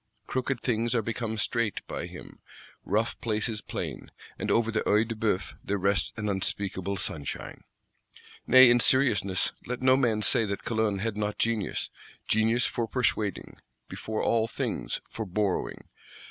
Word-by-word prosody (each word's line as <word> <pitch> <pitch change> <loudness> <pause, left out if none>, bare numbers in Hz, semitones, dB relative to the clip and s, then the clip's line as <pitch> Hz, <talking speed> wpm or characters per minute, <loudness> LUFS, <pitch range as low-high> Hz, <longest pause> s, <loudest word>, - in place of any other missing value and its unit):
Crooked 130 -1 -2
things 120 0 0
are 115 - +2
become 115 0 -3
straight 110 -1 -1
by - - -5
him, - - -11 0.4
rough 110 +4 -1
places 110 -1 -1
plain; - - -5 0.3
and - - -2
over 115 -1 +2
the 110 - 0
Œil 105 +2 +3
de 115 - -3
Bœuf 105 -4 -1
there 100 - -1
rests 100 +1 +1
an 105 -1 -2
unspeakable 100 -1 -1
sunshine. 75 -7 -5 0.8
Nay, 130 -1 +9
in 120 - +5
seriousness, 105 -9 +3 0.2
let 125 +1 -4
no 130 0 +6
man 115 -5 +1
say 115 - +4
that 100 -2 -3
Calonne 110 -4 0
had 110 -1 -2
not 105 0 -2
genius: 115 -3 -1 0.4
genius 115 +2 +3
for 115 -1 -1
Persuading; 110 -4 -1 0.3
before 110 0 -4
all 115 -1 +2
things, - - -3
for 115 - -5
Borrowing. 100 0 -2
110 Hz, 150 wpm, -28 LUFS, 100-115 Hz, 0.8 s, Nay